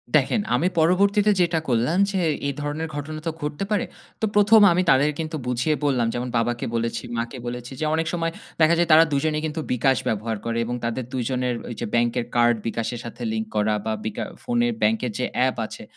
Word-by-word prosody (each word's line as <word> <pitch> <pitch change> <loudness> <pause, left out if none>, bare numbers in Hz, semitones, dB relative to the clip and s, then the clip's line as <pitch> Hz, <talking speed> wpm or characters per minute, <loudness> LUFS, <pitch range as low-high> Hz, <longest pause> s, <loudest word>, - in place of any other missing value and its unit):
দেখেন 155 - +3
আমি 155 +8 +2
পরবর্তীতে 200 +5 +4
যেটা 170 -2 +2
করলাম 125 +8 +1
যে, 195 - -1 0.3
এই 140 - -1
ধরনের 150 +2 -3
ঘটনা 155 +2 -5
তো - - +1
ঘটতে 150 +4 -3
পারে, 210 - +1 0.4
তো - - +3
১ 210 +1 +6
আমি 175 +2 +3
তাদের 145 +3 +4
কিন্তু 160 0 -3
বুঝিয়ে 125 +5 +1
বললাম। 125 -5 +2
যেমন 125 +1 -3
বাবাকে 120 +1 -1
বলেছি, 115 0 -2
মাকে 120 +3 -3
বলেছি 120 +1 -6
যে, 155 - -1
অনেক 160 0 -1
সময় 165 -1 -1 0.3
দেখা 160 +2 +6
যায় 175 0 +1
তারা 155 +1 +8
দুজনেই 155 +2 0
কিন্তু 155 +1 -3
bKash 125 +1 +2
ব্যবহার 110 0 -2
করে 115 0 -1
এবং 120 +1 -3
তাদের 120 +2 -2
দুজনের 125 0 -1
ওইযে 120 - -4
ব্যাংকের 120 0 +1
কার্ড 120 0 +4
bKash 115 0 -2
এর 120 - -7
সাথে 120 +1 -9
লিঙ্ক 110 0 -2
করা 105 0 +2
বা 110 - 0
বিকা 110 - -3 0.2
ফোনে 240 -1 +1
ব্যাংকের 225 0 +1
যে - - +1
অ্যাপ 130 0 +2
আছে। - - -9
135 Hz, 200 wpm, -23 LUFS, 120-165 Hz, 0.4 s, তারা